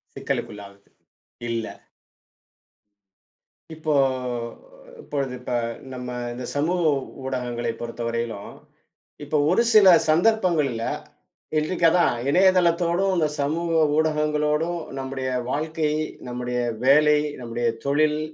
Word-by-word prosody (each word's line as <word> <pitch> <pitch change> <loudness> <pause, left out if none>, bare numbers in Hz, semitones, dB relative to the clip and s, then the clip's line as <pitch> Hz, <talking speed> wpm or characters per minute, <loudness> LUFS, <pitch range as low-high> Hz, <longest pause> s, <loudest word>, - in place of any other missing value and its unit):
சிக்கலுக்குள்ளாவது. 100 -1 -5 0.6
இல்லை. 115 -1 -3 2.0
இப்போ 155 -1 -1 1.1
இப்பொழுது 135 -3 -3
இப்ப 125 - -7 0.4
நம்ம 125 -1 -6 0.2
இந்தச் 125 0 -6
சமூக 175 +5 +1 0.4
ஊடகங்களைப் 120 -3 -3
பொறுத்தவரையிலும், 115 -2 -4 0.7
இப்ப 150 +1 -1
ஒருசில 215 +1 +5 0.2
சந்தர்ப்பங்கள்ல, 165 - +2 0.8
இன்றைக்கு 170 +3 0
அதான் 175 -4 +3 0.2
இணையதளத்தோடும், 180 +1 +3
இந்தச் 150 -2 0
சமூக 165 +3 0 0.2
ஊடகங்களோடும் 150 +2 +1 0.2
நம்முடைய 130 0 -4 0.2
வாழ்க்கை, 155 +2 -1 0.3
நம்முடைய 125 0 -3 0.3
வேலை, 150 +2 +5 0.2
நம்முடைய 120 0 -2 0.2
தொழில், 150 +2 +2
150 Hz, 80 wpm, -24 LUFS, 125-165 Hz, 2.0 s, ஒருசில